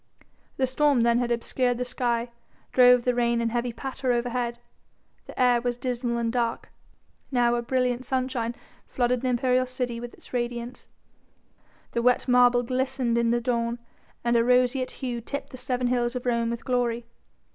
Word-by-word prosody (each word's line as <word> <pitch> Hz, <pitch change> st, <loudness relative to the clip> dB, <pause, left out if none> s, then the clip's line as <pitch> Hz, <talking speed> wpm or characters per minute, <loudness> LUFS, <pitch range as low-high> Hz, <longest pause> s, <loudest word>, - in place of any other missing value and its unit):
The 265 Hz, -, +2 dB
storm 275 Hz, 0 st, +2 dB
then 235 Hz, 0 st, +3 dB
had 245 Hz, -1 st, -1 dB
obscured 245 Hz, +1 st, 0 dB
the 250 Hz, -, -2 dB
sky, 240 Hz, -1 st, -1 dB, 0.4 s
drove 250 Hz, -1 st, +6 dB
the 250 Hz, -, +2 dB
rain 235 Hz, -1 st, +1 dB
in 230 Hz, 0 st, 0 dB
heavy 240 Hz, +1 st, -1 dB
patter 260 Hz, +1 st, -3 dB
overhead, 240 Hz, 0 st, -1 dB, 0.7 s
the -, -, -10 dB
air 245 Hz, -2 st, +4 dB
was 245 Hz, 0 st, -2 dB
dismal 245 Hz, -1 st, -2 dB
and 230 Hz, -1 st, -1 dB
dark: 235 Hz, -2 st, -2 dB, 0.6 s
now 240 Hz, -2 st, +3 dB
a 240 Hz, -, 0 dB
brilliant 250 Hz, 0 st, 0 dB
sunshine 255 Hz, -2 st, -2 dB, 0.3 s
flooded 245 Hz, -1 st, 0 dB
the 260 Hz, -, -1 dB
imperial 255 Hz, +1 st, +2 dB
city 250 Hz, -2 st, -3 dB
with 240 Hz, 0 st, -8 dB
its -, -, -17 dB
radiance, 240 Hz, 0 st, -4 dB, 1.0 s
the 235 Hz, -, -1 dB
wet 250 Hz, +2 st, +2 dB
marble 245 Hz, -1 st, +5 dB
glistened 255 Hz, -1 st, -1 dB
in 235 Hz, 0 st, +2 dB
the 240 Hz, +1 st, +2 dB
dawn 235 Hz, -1 st, -1 dB, 0.5 s
and 235 Hz, 0 st, +2 dB
a 230 Hz, -, +4 dB
roseate 250 Hz, +1 st, +2 dB, 0.2 s
hue 240 Hz, -2 st, -3 dB
tipped 280 Hz, +5 st, -6 dB
the 255 Hz, -, -8 dB
seven 250 Hz, 0 st, -2 dB
hills 245 Hz, 0 st, 0 dB
of 250 Hz, -, -4 dB
Rome 235 Hz, -1 st, +1 dB
with 235 Hz, 0 st, -5 dB
glory. 240 Hz, -2 st, 0 dB
245 Hz, 170 wpm, -26 LUFS, 235-250 Hz, 1.0 s, drove